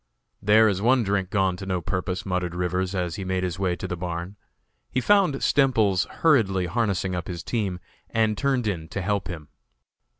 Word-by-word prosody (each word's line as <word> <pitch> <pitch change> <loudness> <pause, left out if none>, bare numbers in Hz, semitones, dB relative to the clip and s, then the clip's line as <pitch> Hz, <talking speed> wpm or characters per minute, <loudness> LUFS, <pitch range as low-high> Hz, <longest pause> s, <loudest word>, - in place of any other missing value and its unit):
"There 105 +2 +5
is 100 -2 0
one 125 +2 +4
drink 100 -2 0
gone 95 -3 +1
to 95 - -7
no 90 -2 0
purpose," 90 +1 -3
muttered 90 -2 -2
Rivers, 90 +2 -1
as 90 -3 -2
he 100 - -4
made 95 0 -1
his 90 -1 -3
way 90 -2 +1
to - - -5
the 90 - -3
barn. 85 +2 -5 0.5
He 130 - 0
found 195 0 +3
Stemples 110 -9 +3
hurriedly 105 - +2
harnessing 95 -1 -1
up 90 -2 -3
his 85 -3 -5
team, 100 -6 -2 0.3
and 110 -1 +1
turned 135 -1 0
in 90 -6 -2
to 100 - -4
help 100 0 -1
him. 80 -6 -7
95 Hz, 190 wpm, -25 LUFS, 90-110 Hz, 0.5 s, There